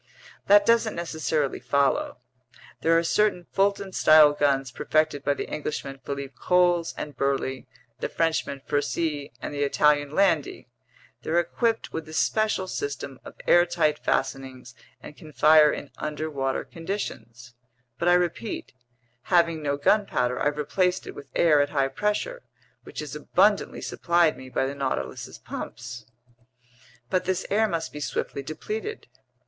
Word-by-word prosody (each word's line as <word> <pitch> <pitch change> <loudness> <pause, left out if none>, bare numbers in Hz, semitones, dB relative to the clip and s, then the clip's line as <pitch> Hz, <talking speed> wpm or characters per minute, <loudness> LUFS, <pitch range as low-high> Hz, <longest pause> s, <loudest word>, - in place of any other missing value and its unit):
"That 205 0 +6
doesn't 230 -1 +3
necessarily 160 -4 -2
follow. 140 -1 +1 0.6
There 165 0 +4
are 165 - +2
certain 180 0 +1
Fulton 200 0 +1
style 155 -3 +6
guns 135 -3 +1
perfected 155 +1 0
by 145 - +1
the - - -5
Englishmen 140 -2 -5
Philippe 140 0 -5
Coles 175 -2 +2
and 145 -2 -6
Burley, 135 -2 -1 0.3
the - - -3
Frenchman 160 -4 -1
Furcy, 145 0 -1
and - - -4
the 145 - -3
Italian 145 0 +3
Landi; 165 -2 +1 0.5
they're 165 +2 +1
equipped 225 +6 -1
with 160 -1 -5
a - - -9
special 215 +1 +1
system 425 - -5
of - - -11
airtight 175 -3 +3
fastenings 130 -3 -2 0.3
and - - -10
can 155 0 -13
fire 150 0 +6
in 145 - -6
underwater 150 -3 -2
conditions. 130 - -6 0.5
But 170 - 0
I 175 - +6
repeat: 180 +5 -2 0.5
having 170 -3 +2
no 140 -1 -1
gunpowder, 145 - +1
I've 145 0 0
replaced 180 +5 0
it - - -8
with - - -11
air 155 -4 +5
at 145 - 0
high 140 -2 +1
pressure, 210 - -2 0.4
which - - -6
is - - -7
abundantly - - +1
supplied 170 -4 +2
me 130 0 -11
by 130 - 0
the 135 - -3
Nautilus's 140 -2 -4
pumps." 115 0 -8 1.0
"But 185 - +1
this 185 -1 -1
air 220 +2 +3
must 165 -5 -3
be 150 - -6
swiftly 140 -1 -3
depleted." 215 - -5
155 Hz, 145 wpm, -25 LUFS, 140-180 Hz, 1.0 s, That